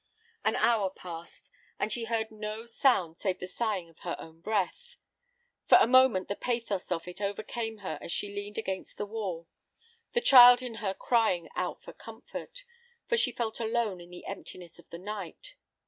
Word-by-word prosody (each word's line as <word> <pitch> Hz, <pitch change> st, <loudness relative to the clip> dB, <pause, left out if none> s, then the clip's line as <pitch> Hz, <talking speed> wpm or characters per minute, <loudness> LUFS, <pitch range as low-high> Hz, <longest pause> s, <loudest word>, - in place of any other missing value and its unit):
An -, -, +2 dB
hour 220 Hz, -5 st, +3 dB
passed, 170 Hz, -2 st, -9 dB, 0.3 s
and 215 Hz, -, -1 dB
she 230 Hz, +1 st, -2 dB
heard 225 Hz, -1 st, -1 dB
no 215 Hz, +1 st, -5 dB
sound 225 Hz, -9 st, +2 dB
save 185 Hz, -2 st, 0 dB
the -, -, -6 dB
sighing 190 Hz, -1 st, -2 dB
of 165 Hz, -, -22 dB
her 175 Hz, -, -3 dB
own 165 Hz, 0 st, -12 dB
breath. 220 Hz, -, -2 dB, 0.7 s
For -, -, +9 dB
a -, -, +6 dB
moment 255 Hz, -5 st, +5 dB
the 200 Hz, -, -2 dB
pathos 230 Hz, -7 st, -2 dB
of 170 Hz, 0 st, -2 dB
it 180 Hz, +3 st, -8 dB
overcame 215 Hz, +2 st, -3 dB
her 155 Hz, -5 st, -3 dB
as -, -, -6 dB
she 200 Hz, +3 st, -2 dB
leaned 205 Hz, +1 st, -5 dB
against 190 Hz, -4 st, -4 dB
the 205 Hz, -, -2 dB
wall, 195 Hz, -6 st, -4 dB, 0.7 s
the 480 Hz, -, +3 dB
child 245 Hz, -, +9 dB
in 245 Hz, -2 st, -5 dB
her 195 Hz, -2 st, -1 dB
crying 220 Hz, -9 st, +1 dB
out -, -, -3 dB
for -, -, -10 dB
comfort, -, -, -9 dB, 0.4 s
for 470 Hz, -, +2 dB
she 280 Hz, -, +2 dB
felt 230 Hz, -2 st, -3 dB
alone 225 Hz, -5 st, -1 dB
in 175 Hz, -, -13 dB
the 180 Hz, 0 st, -11 dB
emptiness 180 Hz, -3 st, -9 dB
of -, -, -18 dB
the 170 Hz, -, -7 dB
night. 210 Hz, -, -7 dB
210 Hz, 180 wpm, -30 LUFS, 180-235 Hz, 0.7 s, For